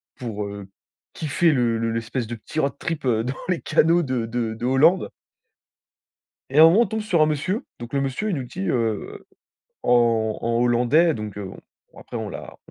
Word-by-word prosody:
pour, 110 Hz, -4 st, -5 dB
heu, 100 Hz, -1 st, -8 dB, 0.5 s
kiffer 160 Hz, +2 st, +1 dB
le 120 Hz, -5 st, +1 dB
le 115 Hz, 0 st, -1 dB
l'espèce 115 Hz, +1 st, -3 dB
de 120 Hz, -, -5 dB
petit 115 Hz, +7 st, -6 dB
road 140 Hz, -2 st, +1 dB
trip 155 Hz, -3 st, -3 dB
dans 120 Hz, +1 st, +1 dB
les 180 Hz, -3 st, -1 dB
canaux 170 Hz, +2 st, +3 dB
de 130 Hz, -5 st, -2 dB
de 115 Hz, -1 st, -2 dB
de 115 Hz, +2 st, -5 dB
Hollande. 150 Hz, +8 st, +4 dB, 1.4 s
Et 140 Hz, -, +2 dB
à -, -, +10 dB
un -, -, +11 dB
moment, 180 Hz, +8 st, +6 dB
on -, -, +4 dB
tombe 220 Hz, +2 st, -3 dB
sur 185 Hz, -6 st, +1 dB
un -, -, +6 dB
monsieur. 155 Hz, -, -2 dB
Donc 120 Hz, +2 st, -9 dB
le 140 Hz, -, +1 dB
monsieur, 135 Hz, +11 st, -2 dB
il 190 Hz, -, 0 dB
nous 135 Hz, -, -3 dB
dit 95 Hz, -5 st, -4 dB
heu 115 Hz, -4 st, -2 dB, 0.6 s
en 115 Hz, -3 st, +2 dB
en 115 Hz, 0 st, 0 dB
hollandais, 125 Hz, +8 st, +3 dB
donc, 105 Hz, -2 st, -6 dB
heu, 100 Hz, -, -5 dB
bon, 95 Hz, -, -10 dB, 0.4 s
après -, -, -8 dB
on -, -, -4 dB
l'a -, -, -9 dB
125 Hz, 200 wpm, -23 LUFS, 115-160 Hz, 1.4 s, un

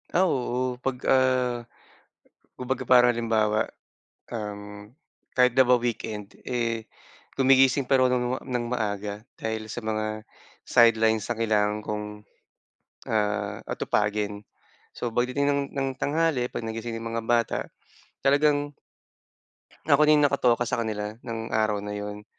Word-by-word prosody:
Ah, 180 Hz, -, +5 dB
oo, 125 Hz, -6 st, -1 dB
'pag 130 Hz, 0 st, -2 dB
ah, 130 Hz, -2 st, +2 dB, 0.9 s
kumbaga 130 Hz, +1 st, -2 dB
parang 125 Hz, -1 st, +5 dB
halimbawa, 110 Hz, -2 st, +1 dB, 0.6 s
um, 105 Hz, -2 st, -6 dB, 0.5 s
kahit 125 Hz, -1 st, +5 dB
na 130 Hz, -, +3 dB
ba 125 Hz, -, +6 dB
weekend, 110 Hz, -4 st, -4 dB
eh, 115 Hz, -2 st, -2 dB, 0.5 s
gumigising 135 Hz, 0 st, +4 dB
pareho 130 Hz, 0 st, +3 dB
ng 125 Hz, 0 st, 0 dB
ng 125 Hz, -2 st, -1 dB
maaga, 105 Hz, -3 st, -2 dB, 0.2 s
dahil 110 Hz, -1 st, -4 dB
sa 115 Hz, +1 st, -6 dB
mga 110 Hz, 0 st, -2 dB, 0.4 s
sidelines 110 Hz, -2 st, +4 dB
na 120 Hz, -, -1 dB
kailangan 105 Hz, -2 st, +1 dB
kong, 105 Hz, 0 st, -3 dB, 1.0 s
ah, 105 Hz, -1 st, 0 dB
atupagin. 105 Hz, 0 st, -1 dB, 0.5 s
So 120 Hz, -, -3 dB
pagdating 125 Hz, +5 st, 0 dB
ng 140 Hz, 0 st, +2 dB
ng 135 Hz, -1 st, -1 dB
tanghali 150 Hz, -3 st, +1 dB
'pag 125 Hz, -, -5 dB
nagising 115 Hz, +1 st, -5 dB
'yong 115 Hz, -, -5 dB
mga 115 Hz, -, -3 dB
bata, 120 Hz, 0 st, +1 dB, 0.6 s
talagang 145 Hz, +1 st, +2 dB, 1.1 s
Ako 150 Hz, 0 st, +5 dB
din 150 Hz, -1 st, +5 dB
nakatoka 125 Hz, -4 st, +2 dB
sa 120 Hz, 0 st, -1 dB
kanila 105 Hz, -2 st, -3 dB
ng 115 Hz, -2 st, -5 dB
araw 110 Hz, -1 st, +2 dB
na 105 Hz, 0 st, -5 dB
'yon, 105 Hz, 0 st, -6 dB
115 Hz, 125 wpm, -26 LUFS, 110-130 Hz, 1.1 s, ba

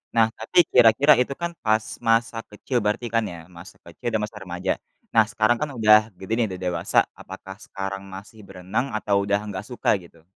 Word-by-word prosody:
Nah 115 Hz, -, +6 dB
tapi 110 Hz, -, -5 dB
kira-kira 125 Hz, +5 st, +6 dB
itu 130 Hz, -, -1 dB
kan 170 Hz, 0 st, -1 dB
pas 110 Hz, 0 st, +2 dB, 0.2 s
masa 115 Hz, 0 st, +2 dB
kecil 125 Hz, +5 st, -3 dB
berarti 105 Hz, +3 st, -1 dB
kan 115 Hz, -, +3 dB
ya, 85 Hz, -, -8 dB, 0.2 s
masa 90 Hz, +4 st, -12 dB
kecil 85 Hz, +6 st, -9 dB
dan -, -, +2 dB
masa 105 Hz, 0 st, -6 dB
remaja. 90 Hz, +1 st, -3 dB, 0.4 s
Nah 110 Hz, -, +6 dB
sekarang 110 Hz, +1 st, +2 dB
kan 150 Hz, -, -2 dB
udah 105 Hz, -1 st, +7 dB, 0.2 s
gede 95 Hz, +3 st, -9 dB
nih 115 Hz, -, +3 dB
udah 90 Hz, -, -10 dB
dewasa, 90 Hz, -, -2 dB, 0.2 s
apakah 95 Hz, 0 st, -10 dB
sekarang 95 Hz, -3 st, -6 dB
masih 105 Hz, +3 st, -12 dB
berenang 95 Hz, +7 st, -3 dB
atau 105 Hz, -1 st, 0 dB
udah 100 Hz, +1 st, 0 dB
nggak 100 Hz, -3 st, -6 dB
suka 125 Hz, -1 st, -2 dB
gitu? 85 Hz, -1 st, -19 dB
105 Hz, 190 wpm, -24 LUFS, 95-115 Hz, 0.4 s, udah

